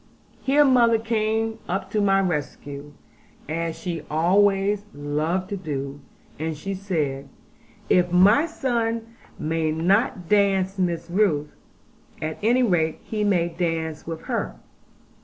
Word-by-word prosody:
Here 290 +2 +4
mother 240 -4 +5
came 225 0 -1
up 190 +1 -2
to 210 - +1
my 195 -1 +4
rescue, 145 -4 -4 0.5
as 165 +1 -2
she 165 -1 -4
always 195 +5 +3
loved 155 +6 -1
to 200 - -3
do; 140 -5 -5 0.4
and 160 0 -3
she 195 +6 -4
said, 155 -8 -2 0.6
'If 180 -1 +3
my 205 - +5
son 230 -6 -2 0.2
may 160 0 -1
not 180 +2 +1
dance 195 -1 +2
Miss 175 -2 -1
Ruth, 170 -6 +1 0.7
at 155 0 -4
any 240 +4 +3
rate 165 -8 +1
he 215 -1 -2
may 180 -4 +2
dance 165 -2 -3
with 165 -1 -5
her. - - -3
185 Hz, 125 wpm, -24 LUFS, 160-210 Hz, 0.7 s, mother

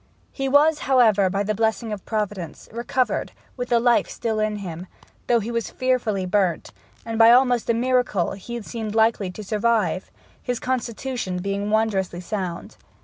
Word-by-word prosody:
He 270 -1 -2
was, 295 +3 +4
however, 220 -7 +5
by 200 +2 -1
the 215 +1 -1
blessing 220 +1 -1
of 200 - -8
Providence, 210 -6 -4
recovered, 245 +3 -1 0.2
with 245 -1 -4
the 235 - +4
life 240 0 +3
still 220 -2 -2
in 215 0 0
him, 180 -3 -7 0.4
though 240 -1 +4
he 225 +2 -4
was 230 -1 -2
fearfully 240 -7 0
burnt; 185 -2 0 0.3
and 225 -1 -3
by 225 0 +8
almost 245 -1 +4
a 230 - +3
miracle 245 -6 +1
he 235 +5 -6
seemed 220 -1 -5
likely 220 -3 +2
to 195 +4 -8
survive, 210 -4 0 0.3
his 245 -2 -3
constitution 245 -5 -3
being 200 +2 -2
wondrously 205 -5 0
sound. 180 -2 -5
220 Hz, 160 wpm, -23 LUFS, 200-240 Hz, 0.4 s, by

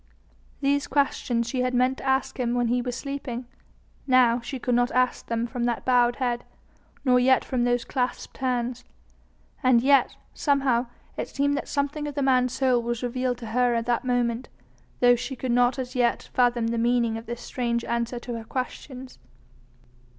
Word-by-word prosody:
These 285 0 +1
questions 255 -4 0
she 250 +1 -1
had 250 0 0
meant 255 +2 +2
to - - -9
ask 265 0 0
him 240 -1 0
when 245 -1 +1
he 245 +1 +1
was 245 0 -4
sleeping: 260 -3 -5 0.6
now 250 -2 +5
she 265 +3 -5
could 250 0 -1
not 245 +1 +3
ask 255 0 +1
them 230 0 -1
from 240 0 -3
that 240 -2 -2
bowed 245 -1 +4
head, 245 -2 -1 0.6
nor 250 -1 +5
yet 260 +1 +4
from 250 -3 0
those 245 -1 +1
clasped 250 -2 -3
hands. 250 -1 -1 0.8
And 255 -3 +5
yet, 275 0 +4 0.2
somehow, 270 -4 +1 0.3
it - - -3
seemed 285 +1 0
that - - -4
something 295 +1 -2
of 290 - -6
the 285 - 0
man's 255 -2 +3
soul 255 -3 +2
was 235 +1 -3
revealed 250 0 -1
to 220 - -7
her 245 -1 +3
at 230 0 -1
this 240 -1 +1
moment, 245 -1 0 0.5
though 245 0 +6
she 265 +3 -5
could 255 0 -3
not 245 +2 +3
as 255 -1 -4
yet 245 -2 0
fathom 240 -2 +2
the 230 0 -1
meaning 235 -1 +2
of 225 +1 -7
this 240 +1 -5
strange 235 -2 -2
answer 235 +1 -2
to 240 - -6
her - - -8
questions. 255 +2 -6
245 Hz, 185 wpm, -25 LUFS, 240-260 Hz, 0.8 s, though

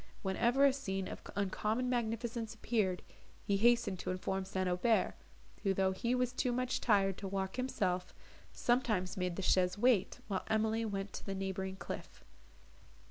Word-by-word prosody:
Whenever 235 +8 +3
a 275 - +5
scene 195 -8 -3
of - - -7
uncommon 210 +5 0
magnificence 230 -1 -1
appeared, 210 -5 0 0.4
he 200 - +1
hastened 235 -4 +3
to - - -4
inform 190 +1 -1
St. 190 0 -2
Aubert, 180 +6 +2 0.5
who, 195 -2 +1
though 190 0 +2
he 235 +6 0
was 250 -1 0
too 250 0 0
much 255 +1 -1
tired 195 -4 +3
to 200 - -4
walk 190 0 -2
himself, 185 -8 -1 0.4
sometimes 220 -7 +1
made 180 -2 -1
the 195 - -4
chaise 180 0 +3
wait, 235 -3 +3
while 195 -3 -1
Emily 220 +1 +1
went 195 -2 -3
to - - -6
the 195 - -4
neighbouring 190 0 -3
cliff. - - -7
200 Hz, 160 wpm, -34 LUFS, 190-235 Hz, 0.5 s, a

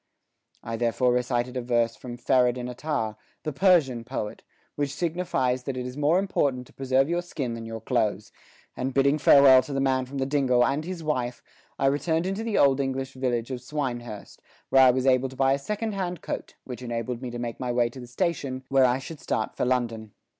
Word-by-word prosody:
I 115 0 -4
therefore 120 +2 +2
recited 125 0 -1
a 125 - -1
verse 120 -1 +1
from 120 -1 -8
Ferideddin 125 -1 +2
Atar, 125 -5 -3 0.3
the 155 - -3
Persian 145 -9 +3
poet, 115 -3 -5 0.3
which 140 -1 -2
signifies 160 -8 0
that 135 -2 -3
it 125 - -3
is 125 0 -6
more 150 +4 +3
important 140 -10 0
to - - -20
preserve 135 0 +1
your 175 +2 0
skin 140 -8 -4
than 115 -1 -6
your 115 -1 -6
clothes, 105 -2 -1 0.4
and 130 +1 -3
bidding 140 +2 +3
farewell 140 -2 +7
to 140 - -7
the 135 - 0
man 130 -1 +1
from 140 +2 -7
the 135 - 0
dingle 130 -3 +3
and 145 +3 -1
his 180 -2 -5
wife 125 -5 -2 0.3
I 135 - 0
returned 160 +4 +1
into 195 +4 -2
the 225 -2 -1
old 140 -1 +4
English 135 -1 -2
village 125 -2 -2
of 125 -1 -4
Swinehurst, 120 -6 -5 0.3
where 135 - +6
I 130 - +8
was 130 +1 +1
able 130 0 +3
to 130 - -12
buy 135 0 +3
a 140 - -1
second 210 +8 -3
hand 180 -4 -3
coat, - - -5
which 125 -1 -8
enabled 120 0 -4
me 130 - -4
to 120 - -6
make 120 -1 -5
my 125 -1 -2
way 120 -1 +2
to 130 - -11
the 125 - -9
station, 135 -2 -2
where 135 -1 +5
I 125 0 +3
should 145 +3 -8
start 110 - -2
for - - 0
London. 115 -4 -1
130 Hz, 210 wpm, -26 LUFS, 120-140 Hz, 0.4 s, I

